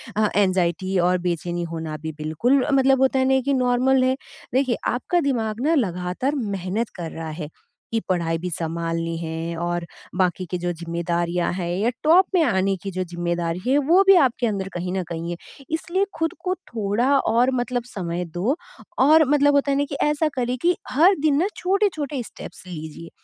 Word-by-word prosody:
अ, 215 0 +2
anxiety 185 -1 +1
और 180 +1 +3
बेचैनी 175 0 -2
होना 160 -2 -4
भी 160 0 -4
बिल्कुल 165 - +1
अ, - - -1
मतलब 270 -1 +4
होता 265 0 +3
है 260 - +3
ना 265 - +4
कि 280 - +2
नॉर्मल 255 +1 +3
है। 260 0 +2 0.4
देखिए, 260 -2 +2
आपका 305 +9 0
दिमाग 230 -6 -1
ना 330 - +4
लगातार 185 - -1
मेहनत 205 -2 -2
कर 170 -3 -5
रहा 160 -1 -6
है 150 - -5 0.4
कि 225 - +1
पढ़ाई 170 -3 0
भी 180 +2 -4
संभालनी 165 0 -2
है 165 0 -4
और 175 0 -2 0.3
बाकी 185 0 +1
के 180 - 0
जो 175 0 -1
ज़िम्मेदारियाँ 170 +1 -1
हैं 175 -2 -3
या 215 +5 +2
टॉप 340 +5 +6
में 355 - +5
आने 195 -7 +1
की 195 - -4
जो 185 0 -2
ज़िम्मेदारी 175 -1 -2
है, 270 +2 +4
वो 325 +7 +4
भी 390 - +9
आपके 245 -1 +1
अंदर 195 -3 -2
कहीं 180 +1 -3
न 190 -1 -1
कहीं 170 0 -4
है। 175 - -4 0.3
इसलिए 345 +4 0
खुद 325 0 0
को 370 0 -1
थोड़ा 225 - -2
और 245 +1 +2
मतलब 245 0 -1
समय 180 -7 -4
दो 205 +11 0 0.4
और 310 +5 +6
मतलब 290 0 +4
होता 280 0 +2
है 275 - +1
ना 285 - +2
कि 280 - -4
ऐसा 300 +1 +2
करें 250 -1 -1
कि 350 +1 +3
हर 345 +9 +5
दिन 295 -1 +2
ना 370 - +2
छोटे-छोटे 355 -8 0
स्टेप्स - - -10
लीजिए। 160 -1 -8
205 Hz, 190 wpm, -23 LUFS, 175-270 Hz, 0.4 s, भी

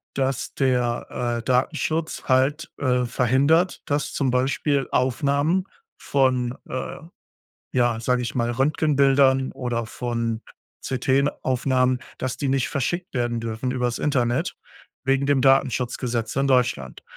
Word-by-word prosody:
dass 135 -2 -1
der, 125 -3 0
äh, 120 -2 -2
Datenschutz 155 +6 0
halt, 135 +4 +1
äh, 125 -2 +1
verhindert, 135 - +2
dass 145 -1 -1
zum 135 -3 0
Beispiel 135 +2 +1
Aufnahmen 140 +7 +1 0.4
von, 130 -2 +1
äh, 130 - -4 0.8
ja, 120 -2 +2
sage 125 +2 +1
ich 120 - -4
mal 120 -1 0
Röntgenbildern 135 0 +3
oder 120 -3 -3
von 115 -1 -3 0.4
CT-Aufnahmen, 130 -1 +1 0.2
dass 130 -1 -3
die 140 - -2
nicht 135 -1 +1
verschickt 175 +7 -2
werden 120 -2 -1
dürfen 115 +2 -3
übers 125 -2 -1
Internet, 125 -5 0 0.5
wegen 135 +1 +2
dem 140 -2 +3
Datenschutzgesetz 125 -3 +1
in 135 0 +2
Deutschland. 120 - 0
130 Hz, 120 wpm, -23 LUFS, 120-140 Hz, 0.8 s, Röntgenbildern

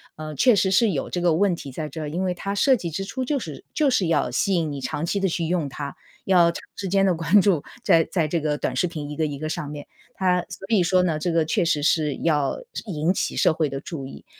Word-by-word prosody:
呃， 155 0 -7
确 245 - +5
实 190 0 +2
是 220 +3 +4
有 150 -7 -2
这 175 - -2
个 175 -2 +3
问 190 -1 +2
题 140 -4 -8
在 155 +3 -4
这 160 +1 -7
儿， 150 - -4
因 175 +5 -2
为 180 -1 0
它 200 +3 -4
设 265 +6 +4
计 175 -8 -4
之 195 +5 -4
初 260 +5 -4
就 285 +3 0
是 160 - -7
就 290 -4 +3
是 190 -8 +2
要 165 - +1
吸 195 -2 +1
引 160 -3 0
你 140 -1 -5
长 150 +5 -3
期 200 +4 -1
地 195 - +1
去 165 0 -1
用 165 -4 -1
它， 140 +1 -6 0.3
要 175 -3 +5
长 - - -8
时 195 - -4
间 195 +1 +3
地 185 - +3
关 165 +5 +4
注， 180 -8 +2 0.2
在 165 -1 +5
在 165 -4 +1
这 165 0 -1
个 150 -1 0
短 - - -2
视 180 - +1
频 150 -3 -6
一 150 - -5
个 155 0 0
一 145 -1 -5
个 155 +2 -4
上 155 -2 -4
面， 145 -1 -7 0.3
它 180 -1 +2
所 185 +2 -8
以 210 -5 +4
说 180 +1 +3
呢， 160 -4 0
这 175 +2 -1
个 165 -1 +2
确 185 +3 +1
实 150 -3 +1
是 150 -3 +2
要 150 -4 +1 0.3
引 165 0 0
起 - - -2
社 - - +4
会 155 -2 0
的 135 0 -4
注 140 -3 -6
意。 - - -12
170 Hz, 295 characters per minute, -24 LUFS, 155-190 Hz, 0.3 s, 确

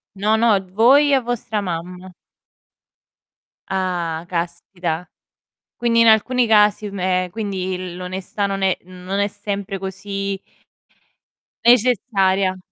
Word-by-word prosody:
No, 210 +3 +2
no, 220 -3 +4
voi 275 +7 +5
a 265 - +4
vostra 235 -3 -3
mamma. 180 0 -6 1.6
Ah, 175 -3 -2
caspita. 170 0 -4 0.7
Quindi, 230 -1 +2
in 230 - +5
alcuni 240 +3 +4
casi, 210 -1 +4
me 185 -1 0
ehm, - - -10
quindi 185 -4 -4
l'onestà 185 +2 -4
non 195 0 -2
è 190 -1 +2
non 185 +2 -6
è 200 - +2
sempre 200 -1 -5
così 195 +1 -4 1.3
necessaria. 200 -6 +3
195 Hz, 110 wpm, -20 LUFS, 185-220 Hz, 1.6 s, voi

